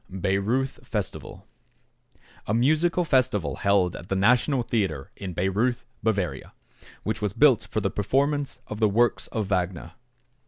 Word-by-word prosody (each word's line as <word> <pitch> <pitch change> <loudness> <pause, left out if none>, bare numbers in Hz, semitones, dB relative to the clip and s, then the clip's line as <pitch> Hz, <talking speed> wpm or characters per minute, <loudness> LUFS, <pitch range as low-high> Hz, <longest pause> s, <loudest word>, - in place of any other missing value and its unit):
=Bayreuth 100 +8 -1
Festival.= - - -5 1.0
A 105 - +1
musical 155 +8 +2
festival 130 - +1
held 100 -3 +2
at 85 - -10
the 95 - 0
National 125 +6 +3
Theatre 95 - -2
in 95 -3 -6
Bayreuth, 105 +8 0 0.2
Bavaria, 95 -11 -2 0.5
which 110 - -2
was 105 -2 -1
built 120 -5 +4
for 110 -1 -1
the 100 - -1
performance 140 +7 0
of 105 - -7
the 110 -2 +4
works 120 +4 +1
of 110 -3 -2
Wagner. 90 -3 -2
105 Hz, 135 wpm, -25 LUFS, 95-125 Hz, 1.0 s, built